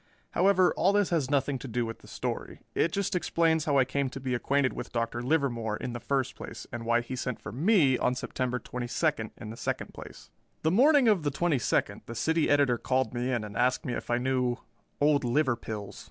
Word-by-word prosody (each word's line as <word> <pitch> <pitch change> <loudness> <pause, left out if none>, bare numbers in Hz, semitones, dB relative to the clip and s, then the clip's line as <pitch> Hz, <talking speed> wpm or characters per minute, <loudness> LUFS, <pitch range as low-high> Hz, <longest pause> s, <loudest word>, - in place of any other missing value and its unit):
However, 185 0 +4
all 195 +3 +3
this 205 -3 +2
has 155 -6 +1
nothing 140 -1 +1
to 135 - -7
do 120 0 -1
with 115 0 -6
the - - -17
story. - - -5
It 165 - +1
just 200 +2 -1
explains 165 -2 +2
how 145 -3 +2
I 130 - +5
came 135 +1 -1
to 135 - -7
be 130 -1 -2
acquainted 135 +2 +1
with - - -6
Dr. 115 0 -2
Livermore, 120 -6 0
in 125 - -5
the 120 - -4
first 135 0 -1
place, - - -8
and 115 -1 -6
why 120 0 +3
he 120 +2 -6
sent 125 -2 -3
for - - -8
me 150 - +3
on 125 - +1
September 125 0 -2
twenty 125 0 -5
second, 110 -1 0
in 110 - -7
the 115 - -9
second - - -3
place. - - -11 0.3
The 160 - +3
morning 270 - +5
of 205 -5 +4
the 150 - 0
twenty 150 0 +1
second - - 0
the 115 - -6
City 160 +6 +1
Editor 140 -4 +3
called 130 -3 0
me 125 +1 -1
in 120 -4 0
and 105 -1 -8
asked 125 +1 +1
me 125 - -2
if - - -5
I 120 - +2
knew 125 -1 0 0.4
"Old 145 -1 +3
Liverpills." 120 -6 -1
130 Hz, 225 wpm, -29 LUFS, 120-155 Hz, 0.4 s, I